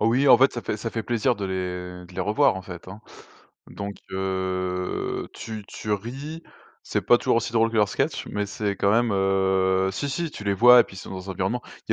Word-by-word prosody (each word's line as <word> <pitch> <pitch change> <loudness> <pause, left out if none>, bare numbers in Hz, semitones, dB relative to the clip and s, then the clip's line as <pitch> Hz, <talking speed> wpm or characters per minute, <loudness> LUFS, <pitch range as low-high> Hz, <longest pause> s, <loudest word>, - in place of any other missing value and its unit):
Oh - - +2
oui, 130 +5 +3
en - - +9
fait, 135 +1 +4
ça 120 - -5
fait - - -2
ça 115 +2 -4
fait 115 - -3
plaisir 115 0 +1
de 100 - -4
les 90 -1 -4
de 90 - -16
les - - -3
revoir, 105 -2 +3
en 95 - -6
fait, 90 -1 -10
hein. 100 +3 -9 0.7
Donc 100 0 -6 0.2
heu, 95 -1 -2
tu 110 -2 -7
tu 105 - -4
ris, 135 - -5 0.4
c'est - - -1
pas 120 - +5
toujours - - +1
aussi 115 0 -1
drôle 115 0 +3
que 115 - -3
leurs 105 -2 +4
sketches 135 +8 -1
mais 105 - -1
c'est 100 0 -2
quand 100 - +2
même, 115 0 +3
heu, 95 -1 +2
si, 120 +10 -3
si, 170 +3 -2
tu - - -8
les 100 -1 +1
vois, 125 +4 +8
et - - +4
puis 95 - -13
ils - - -7
sont - - -10
dans 95 0 -7
un - - -2
environnement 100 +7 -2 0.3
il - - +2
100 Hz, 240 wpm, -25 LUFS, 95-115 Hz, 0.7 s, en